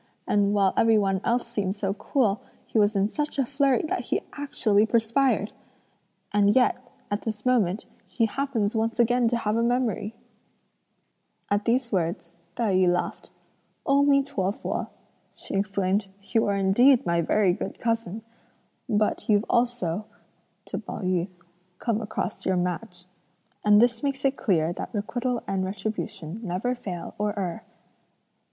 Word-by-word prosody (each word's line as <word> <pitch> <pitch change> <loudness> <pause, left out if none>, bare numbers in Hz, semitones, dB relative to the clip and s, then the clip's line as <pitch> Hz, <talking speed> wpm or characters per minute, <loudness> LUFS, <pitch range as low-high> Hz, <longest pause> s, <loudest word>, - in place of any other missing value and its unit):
and 205 -1 +3
while 195 -2 +3
every 225 -1 +4
one 195 -2 +1
else 240 +1 +1
seemed 205 -5 -2
so 195 -2 -1
cool, 215 -1 0 0.2
he 225 - 0
was 205 0 +3
in 195 0 +3
such 295 +7 -3
a 270 - +2
flurry 275 -1 +2
that 310 - -2
he - - 0
actually 225 -7 +1
perspired! 230 0 +1 0.8
And 205 0 +4
yet, 255 -1 +4 0.4
at 205 - -1
this 215 -1 -5
moment, 215 -6 +2 0.2
he 230 - +1
happens 230 -3 -1
once 225 +2 -1
again 240 +1 +3
to 240 +1 +1
have 215 -2 -1
a 230 - +2
memory!" 235 -3 0 1.4
At 205 0 +1
these 240 +1 +1
words, 170 -2 -2 0.2
Tai 225 -5 0
yü 185 -1 +4
laughed. 175 0 -2 0.6
"O 275 +1 +4
mi 280 -1 +4
to 195 -8 -1
fu!" - - -4 0.5
she - - -9
exclaimed. 195 0 0 0.2
"You 225 +1 +1
are 200 - +1
indeed 235 +7 +4
my 170 -1 +2
very 190 +2 +3
good - - -5
cousin! 225 -3 -2 0.7
But 215 0 0
you've 210 +1 +4
also 220 -6 0 0.6
(to - - -4
Pao - - -7
yü) 180 -1 0 0.5
come 230 0 -1
across 210 - -4
your 185 - +1
match. 180 +1 -3 0.6
And 210 0 +6
this 235 0 +3
makes 275 -1 -2
it 270 0 +3
clear 170 -8 +1
that - - -6
requital 240 +3 -2
and 195 -1 -1
retribution 195 -2 -4
never 205 +5 -1
fail 185 -8 -6
or 210 0 -1
err." 180 -4 -3
215 Hz, 155 wpm, -26 LUFS, 195-240 Hz, 1.4 s, And